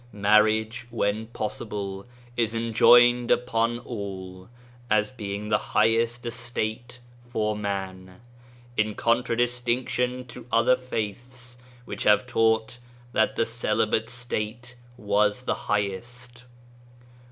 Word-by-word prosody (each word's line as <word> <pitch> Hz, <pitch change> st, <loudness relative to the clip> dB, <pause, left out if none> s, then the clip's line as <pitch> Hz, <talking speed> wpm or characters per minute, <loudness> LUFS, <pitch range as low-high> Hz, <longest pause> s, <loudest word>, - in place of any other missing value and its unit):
Marriage 110 Hz, +3 st, +2 dB
when 110 Hz, -1 st, -1 dB
pos 110 Hz, -2 st, -4 dB
sible, 100 Hz, -2 st, -5 dB, 0.3 s
is 115 Hz, -2 st, 0 dB
enjoined 120 Hz, +1 st, +5 dB
upon 120 Hz, -1 st, +1 dB
all, 95 Hz, -5 st, -7 dB, 0.4 s
as 105 Hz, 0 st, +2 dB
being 105 Hz, -4 st, -5 dB
the 105 Hz, -, +3 dB
highest 115 Hz, +2 st, +1 dB
estate 120 Hz, +1 st, -4 dB, 0.3 s
for 110 Hz, -3 st, -1 dB
man 95 Hz, -3 st, -5 dB, 0.3 s
— 120 Hz, 0 st, -25 dB
in 110 Hz, -1 st, +1 dB
contradistinction 120 Hz, +1 st, 0 dB
to 120 Hz, -1 st, -11 dB
other 115 Hz, +2 st, +4 dB
faiths 125 Hz, +1 st, -6 dB, 0.3 s
which -, -, -7 dB
have 105 Hz, +1 st, +4 dB
taught 115 Hz, 0 st, +1 dB, 0.3 s
that -, -, +1 dB
the 115 Hz, -, +1 dB
celibate 110 Hz, -1 st, 0 dB
state 120 Hz, 0 st, -5 dB, 0.2 s
was 105 Hz, +1 st, +1 dB
the -, -, 0 dB, 0.2 s
highest. 120 Hz, +5 st, -3 dB
115 Hz, 105 wpm, -26 LUFS, 105-120 Hz, 0.4 s, enjoined